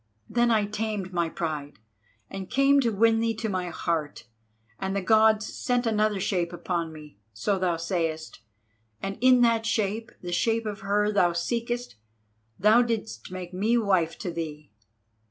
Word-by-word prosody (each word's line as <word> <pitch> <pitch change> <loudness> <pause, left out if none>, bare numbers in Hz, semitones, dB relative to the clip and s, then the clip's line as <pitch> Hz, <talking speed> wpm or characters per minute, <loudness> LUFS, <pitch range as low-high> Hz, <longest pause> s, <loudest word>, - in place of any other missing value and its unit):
Then 240 0 +2
I 220 -3 +3
tamed 210 -2 -3
my 170 -2 0
pride 150 -4 -4 0.5
and 190 +5 -7
came 275 +1 +4
to 240 - +2
win 225 +1 +3
thee 225 0 0
to 220 +1 -3
my 185 -3 -2
heart, 160 -3 -3 0.6
and 190 0 -2
the 200 - 0
Gods 220 +1 +4
set 245 -1 0
another 215 -2 +1
shape 175 -2 -1
upon 170 -1 -3
me—so 150 - -4
thou 180 -2 +1
sayest—and 135 - -5
in 255 -1 +6
that 230 -1 +3
shape, 220 0 -1
the 175 - -5
shape 225 +5 +1
of 210 -2 -4
her 210 +1 +1
thou 180 -4 +3
seekest, 235 - -3 0.6
thou 215 +5 +5
didst 215 - -3
make 185 -1 -7
me 215 +6 +2
wife 185 -7 +1
to 180 - -4
thee. 155 -4 -6
195 Hz, 155 wpm, -26 LUFS, 170-225 Hz, 0.6 s, in